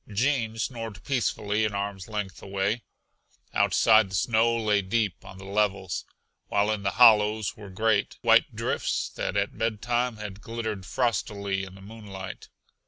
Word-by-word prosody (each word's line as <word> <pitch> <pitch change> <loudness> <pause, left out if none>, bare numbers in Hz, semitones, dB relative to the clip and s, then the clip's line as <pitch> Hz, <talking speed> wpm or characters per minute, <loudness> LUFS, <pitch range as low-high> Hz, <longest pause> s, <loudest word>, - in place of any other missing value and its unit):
Gene 115 0 0
snored 115 -3 -4
peacefully 110 -5 0
an 105 -2 0
arm's 100 -1 -4
length 105 -4 -4
away. 100 +4 -1 0.7
Outside 110 -3 +4
the 95 - -4
snow 115 +4 +2
lay 105 -2 +2
deep 100 0 -1
on 95 - -11
the 95 - -10
levels, 100 -2 -1 0.4
while 105 +1 +2
in 105 -2 -2
the 100 - 0
hollows 110 -3 +5
were 105 -2 -10
great, 110 +2 +1
white - - +4
drifts - - -1
that - - -3
at 100 0 -1
bedtime 120 +2 0
had 105 -1 -7
glittered 110 -5 -4
frostily 100 -4 -1
in 95 -1 -9
the 95 - -14
moonlight. 100 -2 -9
105 Hz, 150 wpm, -27 LUFS, 100-115 Hz, 0.7 s, hollows